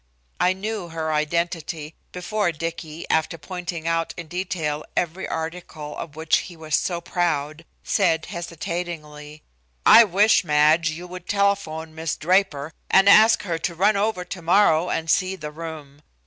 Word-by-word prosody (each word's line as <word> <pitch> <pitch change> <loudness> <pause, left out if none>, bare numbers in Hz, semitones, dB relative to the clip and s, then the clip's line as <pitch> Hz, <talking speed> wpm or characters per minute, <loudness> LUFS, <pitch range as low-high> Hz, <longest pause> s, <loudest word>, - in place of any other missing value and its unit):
I 180 - +3
knew 205 -1 -4
her 160 -1 -3
identity 160 0 -2 0.2
before 185 +1 -1
Dicky, 165 0 -6
after 160 +1 +1
pointing 170 +1 -6
out 165 0 -1
in 170 - -6
detail 165 -4 -3
every 175 +2 -1
article 160 -2 -6
of 155 -3 -7
which 160 0 +2
he 175 -3 -9
was 155 -2 -8
so 175 -2 -1
proud, 165 -3 -2 0.2
said 165 -6 +1
hesitatingly: 165 -3 -6 0.4
"I 230 - +9
wish, 205 +3 +4
Madge, 155 +1 +3
you 165 +3 -6
would 180 0 -10
telephone 200 -6 0
Miss 160 0 -3
Draper 160 -4 +1 0.2
and 195 +1 +5
ask 215 +3 +7
her 170 -5 -2
to 170 +1 -3
run 200 +5 +3
over 200 -3 0
tomorrow 175 -1 +2
and 165 0 -2
see 185 +3 +1
the 150 -4 -7
room. 150 -3 -9
165 Hz, 150 wpm, -23 LUFS, 155-180 Hz, 0.4 s, I